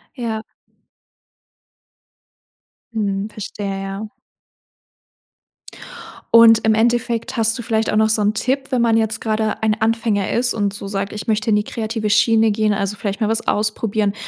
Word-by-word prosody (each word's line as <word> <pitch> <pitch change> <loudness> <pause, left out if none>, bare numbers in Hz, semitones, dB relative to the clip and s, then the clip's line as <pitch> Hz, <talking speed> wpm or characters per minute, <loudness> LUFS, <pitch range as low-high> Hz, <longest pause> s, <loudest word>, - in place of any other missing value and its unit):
Ja. 225 -4 -3 2.5
Mhm, 205 -2 -2
verstehe, 200 -2 -5
ja. 195 +2 -5 2.3
Und 225 -1 +7
im 220 - +4
Endeffekt 235 +1 0
hast 225 +1 +1
du - - -2
vielleicht 225 -1 -1
auch - - +1
noch 220 0 +3
so 220 - +2
'n 210 +1 +2
Tipp, 270 +4 -2
wenn 250 -2 +1
man 225 -1 +3
jetzt 220 0 -1
grade 220 -1 -1
ein 215 -1 +1
Anfänger 220 -3 0
ist 245 +1 +1
und 205 -2 -1
so 200 -1 -7
sagt: 195 0 -3
„Ich 210 - -7
möchte 220 0 0
in - - +4
die 210 - +1
kreative 220 0 -3
Schiene 220 +1 +4
gehen. 215 0 +1
Also, 200 0 -2
vielleicht 200 +2 -4
mal 215 - +1
was 225 0 -1
ausprobieren, 210 -1 0
220 Hz, 155 wpm, -19 LUFS, 210-225 Hz, 2.5 s, Und